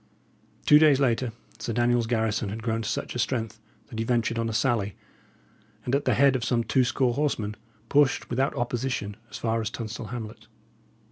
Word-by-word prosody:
Two 150 - +8
days 150 -3 +5
later 125 -2 +1 0.3
Sir 115 - -3
Daniel's 120 0 +2
garrison 110 -2 0
had 110 +3 -6
grown 115 -1 0
to 105 - -3
such - - -3
a 125 - -4
strength 115 -3 -1 0.3
that 110 0 -8
he - - +1
ventured 115 -1 0
on 115 0 0
a - - -2
sally, 110 -3 0 0.9
and 125 - -2
at 140 +1 +1
the - - +3
head 140 -1 +5
of 125 - -1
some 120 -1 +1
two 120 +4 +2
score 125 0 +1
horsemen, 115 -7 -1 0.3
pushed 145 -1 +3
without 130 +3 0
opposition 120 -4 -2
as - - -7
far 115 0 0
as 110 - -2
Tunstall 110 0 -6
hamlet. 110 -2 -7
120 Hz, 190 wpm, -26 LUFS, 110-130 Hz, 0.9 s, Two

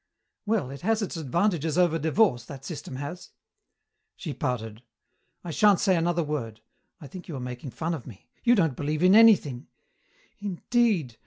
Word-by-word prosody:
"Well, 205 - 0
it 140 - -9
has 220 +3 +1
its 195 - -4
advantages 165 +1 0
over 170 -2 +3
divorce, 160 - +2
that 135 0 -10
system 150 -5 -7
has." 145 +7 -7 0.9
She 155 -6 -6
pouted. 115 -6 -4 0.6
"I 175 - -5
shan't 205 +4 +4
say 190 -3 +3
another 170 0 +1
word. 120 -8 -4 0.4
I 155 - -11
think 180 +5 -10
you 160 - -6
are - - -5
making 125 +2 -6
fun 160 +8 -3
of 150 -7 -7
me. 110 -6 -13 0.2
You 240 0 +5
don't 165 - +1
believe 150 +4 -2
in 185 +1 +6
anything 190 - +5 0.4
" - - -39 0.3
"Indeed. 200 - 0
160 Hz, 170 wpm, -26 LUFS, 135-185 Hz, 0.9 s, in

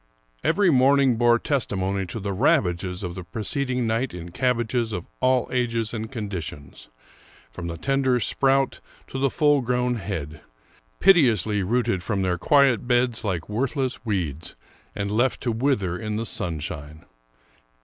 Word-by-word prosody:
Every 200 -4 +3
morning 135 -1 +4
bore 120 0 +4
testimony 100 -8 -1
to 115 - -5
the 100 -1 -3
ravages 95 - +1
of 90 -1 -4
the 90 0 -7
pre 110 +5 -6
ceding 130 -1 -1
night 115 0 -1
in 85 0 -8
cabbages 120 0 0
of 90 -2 -4
all 130 -1 +2
ages 115 -3 -1
and 110 -1 -5
conditions, 90 - -6 0.6
from 85 +4 -6
the 85 0 -5
tender 135 - +1
sprout 135 +3 +1 0.3
to 135 - -4
the 135 0 +2
full 145 -1 +3
grown 125 0 0
head, 80 -7 -5 0.6
piteously 115 - +4
rooted 115 -1 0
from 100 0 -1
their 90 -1 0
quiet 135 - +3
beds 120 -2 +1
like 90 -6 -2
worthless 130 +3 -2
weeds, 85 - -3 0.4
and 100 0 -2
left 120 +5 +1
to 120 - 0
wither 110 -7 0
in 105 -1 -3
the 115 +2 -2
sunshine. 75 -5 -4
115 Hz, 150 wpm, -24 LUFS, 95-130 Hz, 0.6 s, morning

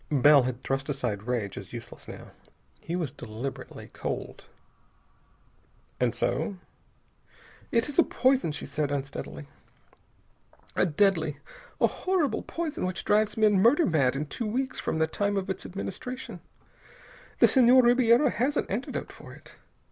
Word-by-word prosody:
Bell 145 0 +6
had 125 0 -4
thrust 135 +2 -2
aside 120 -7 -3
rage 115 -6 -2
as - - -12
useless, - - -9
now. - - -10 0.5
He 170 - -4
was 165 -7 -2
deliberately 120 +4 -7
cold. - - -5 1.5
"And 125 -2 +1
so?" 155 - -1 1.1
"It 230 +1 +2
is 290 +2 -2
a - - +9
poison," 260 - +2
she 150 - -5
said 150 -2 -2
unsteadily. 140 +1 -5 1.3
"A - - +3
deadly, 160 -3 +1 0.4
a - - +5
horrible 365 -6 0
poison 330 -3 -4
which 185 -1 -3
drives 215 +1 +2
men 210 -3 +4
murder 265 - +5
mad 140 -6 +2
in 145 +2 -2
two 215 +9 -4
weeks 260 +4 -2
from - - -2
the 160 - +3
time 200 +5 -1
of 190 0 -2
its 190 - -5
administration. 220 +7 -6 1.0
The - - +7
Senhor 255 0 +6
Ribiera 240 +2 +4
has 270 +6 0
an - - +1
antidote 220 +7 -3
for - - -12
it. - - -16
185 Hz, 145 wpm, -27 LUFS, -, 1.5 s, a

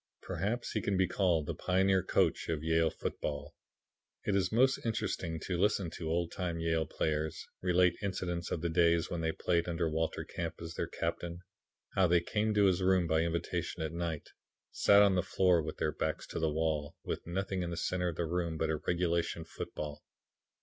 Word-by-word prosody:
Perhaps 115 +5 -2
he 110 - -1
can 100 -1 0
be 95 -1 +3
called 90 -4 +2
the - - -2
pioneer 95 +1 +2
coach - - +1
of 80 -2 -1
Yale 80 0 +3
football. 70 -1 -4 0.7
It 100 - +1
is 95 -2 +1
most 130 +4 +3
interesting 90 -7 -2
to 90 0 -2
listen 100 -3 +2
to 80 0 -5
old 85 +1 0
time 85 -3 -3
Yale 80 -2 +1
players 75 0 -2 0.2
relate 90 -1 +3
incidents 90 -3 -2
of 80 - -2
the 85 - 0
days 85 0 +3
when 85 - -2
they 80 0 +1
played 85 +1 0
under 85 -1 0
Walter 80 +1 -1
Camp 85 -1 -4
as 85 0 -6
their - - -2
captain: 85 0 -3 0.5
how 95 -1 +4
they 85 0 +5
came 105 +5 0
to 105 -1 +5
his 95 -1 +3
room 95 -1 +4
by 80 -1 +2
invitation 85 0 -2
at 80 0 -3
night, 85 -3 -3 0.4
sat 100 0 +6
on 100 -1 +5
the 90 - +3
floor 90 -2 +3
with 80 - -5
their - - 0
backs - - -2
to - - -5
the 80 -1 +2
wall, 75 -2 -1
with - - -4
nothing 95 +1 -2
in 85 - -2
the 85 - -4
center 90 +1 0
of 85 - -2
the 85 - -1
room 85 -1 -1
but 80 0 0
a 80 - 0
regulation 85 0 0
football. 75 -2 -6
85 Hz, 200 wpm, -32 LUFS, 80-95 Hz, 0.7 s, sat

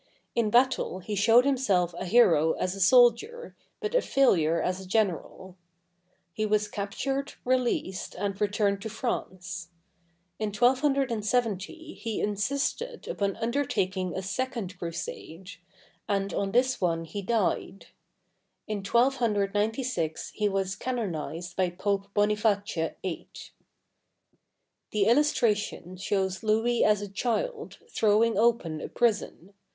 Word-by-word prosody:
In 230 -2 +1
battle 245 -4 +2
he 190 +3 -6
showed 225 +5 +5
himself 200 -11 +1
a 185 - -5
hero 175 -7 +4
as 185 - -2
a 195 - -6
soldier, 245 - +4 0.2
but 430 0 -3
a - - +4
failure 170 - +3
as 185 +1 -1
a 190 - -10
general. 190 -2 -1 0.8
He 215 - -2
was 210 0 +1
captured, 270 +8 -3
released, 245 -7 -1
and 195 +2 -3
returned 205 -1 +1
to 220 - -5
France. 190 -5 -4 0.7
In 215 - -1
1270 245 - 0
he 225 -2 -4
insisted 280 - -2
upon 200 -1 -1
undertaking 195 -7 -1
a 190 - -3
second 210 -2 -3
crusade; 170 +1 -6 0.6
and 195 -1 0
on 195 -1 -1
this 255 +3 +2
one 165 -2 +1
he 200 +5 -5
died. 200 -2 -1 0.8
In 215 -1 -3
1296 220 - 0
he 210 -1 0
was 195 -1 -1
canonized 175 -8 -4
by 185 -1 +1
Pope 200 +2 -2
Boniface 210 0 +2 0.4
VIII. 185 -3 -5 1.6
The 210 -2 +1
illustration 225 - +1
shows 190 0 -1
Louis 225 +2 +2
as 210 -1 +3
a - - -4
child, 345 - -3
throwing 220 - +2
open 205 -8 +1
a - - -4
prison. 205 -5 -1
210 Hz, 120 wpm, -28 LUFS, 190-240 Hz, 1.6 s, showed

